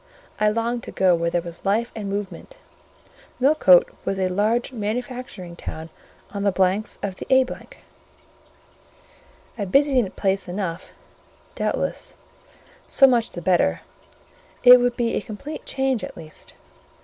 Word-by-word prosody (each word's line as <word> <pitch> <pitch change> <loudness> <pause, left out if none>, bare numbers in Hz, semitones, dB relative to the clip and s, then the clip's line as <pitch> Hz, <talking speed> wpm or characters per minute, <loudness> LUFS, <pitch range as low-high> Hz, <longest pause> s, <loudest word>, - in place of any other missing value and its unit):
I 210 0 +4
longed 230 +2 -1
to - - -8
go 185 -2 +3
where 170 0 0
there 170 0 -1
was 170 -1 -8
life 220 +4 0
and 210 -3 -5
movement: 205 - -6 0.8
Millcote 255 - +5 0.2
was 195 - -2
a 185 -1 0
large 215 +7 0
manufacturing 230 -5 -5
town 160 -1 -8 0.4
on 200 - -4
the 200 0 +2
banks 190 +3 0
of 190 -2 -3
the - - -8
A——: 260 0 +6 2.1
a 205 - -1
busy 270 -2 +3
place 195 0 -1
enough, 180 -2 -4 0.6
doubtless: - - -3 0.7
so 270 - +6
much 240 -3 +2
the 175 - -7
better; 170 - +2 0.8
it 250 0 +10
would 245 0 0
be 235 -1 0
a - - -1
complete 225 +8 -8
change 265 -4 -1
at - - -7
least. 155 -2 -11
205 Hz, 135 wpm, -23 LUFS, 185-245 Hz, 2.1 s, it